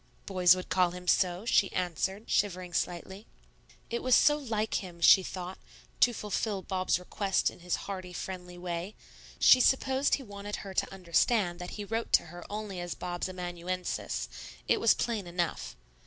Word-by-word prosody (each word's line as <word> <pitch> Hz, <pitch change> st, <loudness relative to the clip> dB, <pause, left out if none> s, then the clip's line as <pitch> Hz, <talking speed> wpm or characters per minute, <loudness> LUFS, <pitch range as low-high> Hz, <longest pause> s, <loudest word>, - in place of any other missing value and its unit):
"Boys 185 Hz, -2 st, +5 dB
would 185 Hz, -, -6 dB
call 180 Hz, 0 st, +3 dB
him 180 Hz, +1 st, -9 dB
so," 180 Hz, +2 st, +2 dB
she 200 Hz, -4 st, +3 dB
answered, 185 Hz, +4 st, -2 dB
shivering 185 Hz, -3 st, 0 dB
slightly. 190 Hz, +5 st, -3 dB, 0.6 s
It 235 Hz, -, -1 dB
was 255 Hz, -1 st, +4 dB
so 295 Hz, -, +5 dB
like 220 Hz, -7 st, -2 dB
him, 175 Hz, -2 st, -10 dB
she 190 Hz, +3 st, +8 dB
thought, 185 Hz, 0 st, -6 dB, 0.4 s
to 245 Hz, -, +6 dB
fulfil 210 Hz, -2 st, -2 dB
Bob's 185 Hz, 0 st, 0 dB
request 195 Hz, +2 st, 0 dB
in -, -, -16 dB
his 175 Hz, 0 st, -1 dB
hearty, 185 Hz, -2 st, -6 dB
friendly 180 Hz, 0 st, -7 dB
way; 175 Hz, +3 st, -4 dB, 0.4 s
she 255 Hz, -, +7 dB
supposed 265 Hz, +1 st, +3 dB
he 275 Hz, -, -8 dB
wanted 205 Hz, -2 st, -6 dB
her 195 Hz, -, -7 dB
to -, -, 0 dB
understand 180 Hz, +1 st, +1 dB
that 180 Hz, +3 st, -7 dB
he 205 Hz, -, -5 dB
wrote 225 Hz, +2 st, -3 dB
to -, -, +5 dB
her 175 Hz, 0 st, -8 dB
only 210 Hz, -3 st, -5 dB
as 175 Hz, -1 st, -4 dB
Bob's 175 Hz, +1 st, -4 dB
amanuensis, 180 Hz, 0 st, -4 dB, 0.4 s
it -, -, +3 dB
was -, -, +5 dB
plain 220 Hz, -6 st, -2 dB
enough. 175 Hz, -1 st, -3 dB
185 Hz, 170 wpm, -30 LUFS, 180-210 Hz, 0.6 s, she